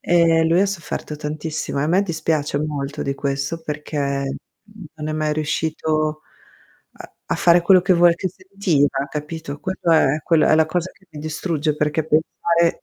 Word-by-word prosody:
Ehm, 165 -2 +3
lui 170 +2 +4
ha 200 - +3
sofferto 170 -5 -5
tantissimo, 155 0 -4
e - - +1
a - - 0
me 180 +5 +3
dispiace 160 -5 -1
molto 145 -1 -3
di 140 - -2
questo, 140 +3 -3
perché, 150 0 -6
mhmm, 140 +9 -5
non 150 0 -5
è - - -2
mai 155 0 0
riuscito 155 0 -1 0.7
a - - -13
a - - -1
fare 175 0 +4
quello 185 +1 +6
che 185 +1 +3
vuoi 170 0 +5
che 185 +2 -3
sentiva, 175 -8 0
capito? 150 -1 -6
Quello 190 -2 -2
è 155 -1 +3
quello 160 -2 +3
è - - +5
la 160 0 +4
cosa 175 +3 -2
che 190 - -27
mi 155 - -10
distrugge, 155 0 -2
perché 150 +1 0
pensare 165 +2 +1
155 Hz, 180 wpm, -21 LUFS, 150-170 Hz, 0.7 s, quello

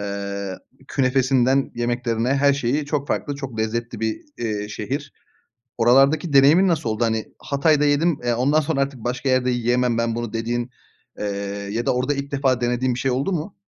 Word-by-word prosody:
Eee, 100 -1 -4 0.3
künefesinden 130 0 +2
yemeklerine, 120 -1 -1
her 140 0 +4
şeyi 140 +2 0
çok 145 -1 -2
farklı, 145 - -2
çok 135 -5 -7
lezzetli 115 +1 -2
bir, 110 -1 -2 0.2
iii, 105 -3 -3
şehir. - - -4 0.7
Oralardaki 135 +6 +4
deneyimin 150 +8 +6
nasıl 160 -8 0
oldu; 110 +2 -1
hani, 110 -1 -1
Hatay'da 150 +1 +2
yedim, 145 +2 +2
eee, 120 -1 +1
ondan 140 +6 +2
sonra 145 -2 -1
artık 135 -2 -2
başka 125 +2 -2
yerde 130 0 +2
yiyemem 120 0 +1
ben 115 -1 0
bunu 120 -1 -4
dediğin, 120 +2 -2 0.5
eee, - - -2 0.5
ya 115 +2 -2
da - - +2
orada 130 +3 0
ilk 140 0 -5
defa 135 -3 +1
denediğin 125 +1 0
bir - - -5
şey 135 - 0
oldu 135 +9 -1
mu? 175 +2 -3
125 Hz, 175 wpm, -22 LUFS, 115-140 Hz, 0.7 s, deneyimin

